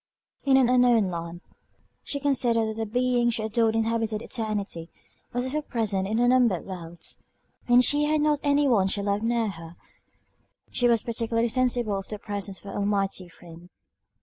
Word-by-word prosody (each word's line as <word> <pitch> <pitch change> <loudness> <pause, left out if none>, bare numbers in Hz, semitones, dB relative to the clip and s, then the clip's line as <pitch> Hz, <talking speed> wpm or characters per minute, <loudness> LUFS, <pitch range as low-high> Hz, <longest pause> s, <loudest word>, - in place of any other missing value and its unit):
In 270 -1 +5
an 260 -2 +4
unknown 245 -5 +4
land, 170 0 -6 0.6
she 280 - -4
considered 240 -5 +1
that 220 - -6
the 225 -1 -2
Being 245 +1 +1
she 225 -2 -2
adored 225 0 +1
inhabited 225 -1 -1
eternity, 210 -8 -3 0.4
was 245 +1 -2
ever 295 +4 -2
present 215 -8 -2
in 215 +2 -1
unnumbered 245 -5 +3
worlds. 170 -3 -7 0.5
When 245 0 +6
she 295 +3 +3
had 305 +1 +1
not 295 -1 +2
any 285 0 +2
one 205 -7 +3
she 200 +1 -1
loved 200 0 0
near 230 -1 0
her, 165 -3 -10 1.0
she 245 - +2
was 230 -2 +3
particularly 230 0 -1
sensible 240 -4 +1
of 195 - -9
the 210 - -5
presence 200 -2 -5
of - - -17
her 200 - -8
Almighty 195 -3 -1
Friend. 170 +1 -14
225 Hz, 170 wpm, -26 LUFS, 200-245 Hz, 1.0 s, When